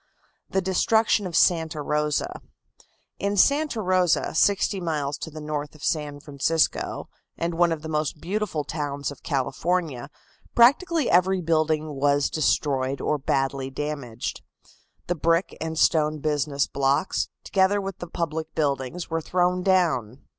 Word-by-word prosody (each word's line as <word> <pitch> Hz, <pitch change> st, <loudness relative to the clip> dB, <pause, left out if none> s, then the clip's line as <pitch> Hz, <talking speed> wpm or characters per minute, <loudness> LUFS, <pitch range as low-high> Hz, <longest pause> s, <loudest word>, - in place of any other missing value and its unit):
THE 190 Hz, -, 0 dB
DESTRUCTION 210 Hz, +2 st, +2 dB
OF 170 Hz, -, -6 dB
SANTA 160 Hz, -3 st, +3 dB
ROSA. 150 Hz, 0 st, -1 dB, 0.8 s
In 200 Hz, +1 st, -1 dB
Santa 280 Hz, 0 st, +3 dB
Rosa, 180 Hz, -2 st, +2 dB
sixty 200 Hz, +3 st, +2 dB
miles 150 Hz, -4 st, -2 dB
to -, -, -5 dB
the 155 Hz, 0 st, -9 dB
north 150 Hz, -1 st, -4 dB
of 150 Hz, -, -14 dB
San 150 Hz, -3 st, -1 dB
Francisco, 150 Hz, +2 st, -1 dB, 0.3 s
and 170 Hz, +1 st, -2 dB
one 170 Hz, 0 st, +3 dB
of 160 Hz, -2 st, -3 dB
the -, -, -5 dB
most 155 Hz, -1 st, -2 dB
beautiful 185 Hz, -2 st, -2 dB
towns 145 Hz, -2 st, -3 dB
of 145 Hz, -, -12 dB
California, 150 Hz, 0 st, -1 dB, 0.5 s
practically 300 Hz, +5 st, +4 dB
every 185 Hz, +2 st, +3 dB
building 155 Hz, -2 st, 0 dB
was 140 Hz, 0 st, +1 dB
destroyed 140 Hz, -3 st, 0 dB
or 150 Hz, -, 0 dB
badly 135 Hz, 0 st, -1 dB
damaged. 135 Hz, -4 st, -5 dB, 0.6 s
The 175 Hz, -, 0 dB
brick 165 Hz, +2 st, +1 dB
and 160 Hz, 0 st, -3 dB
stone 155 Hz, -1 st, +3 dB
business 145 Hz, -1 st, 0 dB
blocks, 140 Hz, +6 st, 0 dB
together 195 Hz, +1 st, +2 dB
with 195 Hz, -1 st, -5 dB
the 175 Hz, -, -6 dB
public 160 Hz, -1 st, -4 dB
buildings, 145 Hz, +2 st, -2 dB
were 165 Hz, 0 st, 0 dB
thrown 180 Hz, +2 st, +1 dB
down. 155 Hz, -, +1 dB
160 Hz, 140 wpm, -25 LUFS, 145-180 Hz, 0.8 s, practically